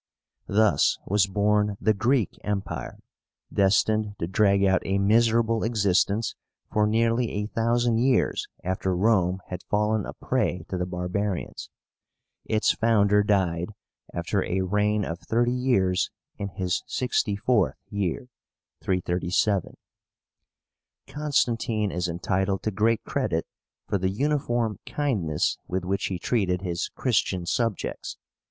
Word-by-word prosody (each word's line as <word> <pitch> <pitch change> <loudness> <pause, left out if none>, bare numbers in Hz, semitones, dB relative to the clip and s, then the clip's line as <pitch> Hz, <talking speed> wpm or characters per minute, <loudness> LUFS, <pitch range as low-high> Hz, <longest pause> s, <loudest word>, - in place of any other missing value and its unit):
Thus 105 -7 +3
was 100 0 +2
born 105 +1 +1
the 110 - +3
GREEK 120 +1 0
EMPIRE, 100 -1 -3 0.6
destined 105 +2 +2
to 85 - -2
drag 100 +2 +3
out 95 -1 +3
a 95 +1 0
miserable 115 +2 +3
existence 105 -1 +1 0.4
for 105 0 +3
nearly 115 +2 +2
a 105 0 -2
thousand 115 +1 +1
years 125 +1 +2 0.2
after 95 0 -1
Rome 95 -2 +2
had 90 -1 -5
fallen 105 0 0
a - - -6
prey 90 -2 -1
to 95 - -2
the 90 - -1
barbarians. 90 +2 -3 0.8
Its 110 0 +2
founder 105 -2 +3
died, 95 -2 0 0.4
after 90 +3 -1
a 95 +1 -1
reign 105 +2 +1
of 85 +1 -5
thirty 120 +4 +1
years, 100 -8 +1 0.3
in 100 - -4
his 90 0 -2
sixty 120 -5 0
fourth 115 +3 +1 0.2
year 100 +3 -2 0.5
(337). 90 +2 0 1.3
Constantine 120 -7 0
is 90 0 -1
entitled 95 +3 -1
to 110 - 0
great 110 +3 +1
credit 100 -13 -1 0.4
for 100 - 0
the 95 +1 +1
uniform 120 -3 0
kindness 100 - -1
with 90 0 -2
which 95 +1 -1
he 95 - -3
treated 90 -2 0
his 85 -2 -2
Christian 100 -7 0
subjects. 115 +1 -2
105 Hz, 125 wpm, -26 LUFS, 95-115 Hz, 1.3 s, Thus